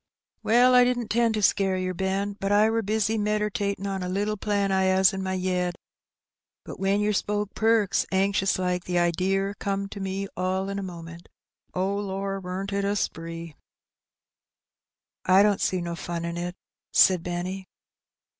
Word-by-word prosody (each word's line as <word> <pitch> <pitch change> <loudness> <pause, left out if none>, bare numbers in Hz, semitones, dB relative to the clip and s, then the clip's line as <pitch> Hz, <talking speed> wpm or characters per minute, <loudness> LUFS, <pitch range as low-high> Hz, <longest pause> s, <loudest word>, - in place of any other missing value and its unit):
"Well, 245 +3 +4
I 250 0 +7
didn't 245 -2 0
'tend 230 0 +2
to 210 - -1
scare 195 -1 +2
yer, 185 0 -2
Ben, 195 +2 -1
for 195 0 -3
I 210 +2 +4
wur 225 0 +1
bissy 220 +1 0
medertatin' 210 -1 -1
on 195 -1 -3
a 180 - -3
little 205 +3 -1
plan 200 -1 0
I 190 0 +2
'as 190 +1 +4
in 190 - -3
my 190 0 -2
yed; 180 -1 -1 0.9
but - - -9
when 195 +1 +1
yer 210 0 +1
spoke 205 0 -1
'Perks!' 220 -2 +2
anxious 195 0 +1
like, 180 -1 -1
the 180 -1 -1
idear 190 +3 +1
comed 195 0 -2
to 200 - -7
me 195 +1 -3
all 185 +1 -1
in 200 0 -3
a - - -3
moment. 170 -2 -9 0.5
Oh, 190 +2 0
lor, 195 -1 -3
weren't 190 +2 -5
it 200 0 0
a 200 +1 0
spree! 165 -3 -4 0.9
" - - -67 0.7
"I 190 +2 +6
don't 205 -2 +2
see 185 -1 0
no 170 0 -4
fun 170 0 -4
in 170 0 -4
it," 175 +1 -4 0.4
said 185 -3 +5
Benny. 180 +2 -4
195 Hz, 175 wpm, -26 LUFS, 185-205 Hz, 0.9 s, I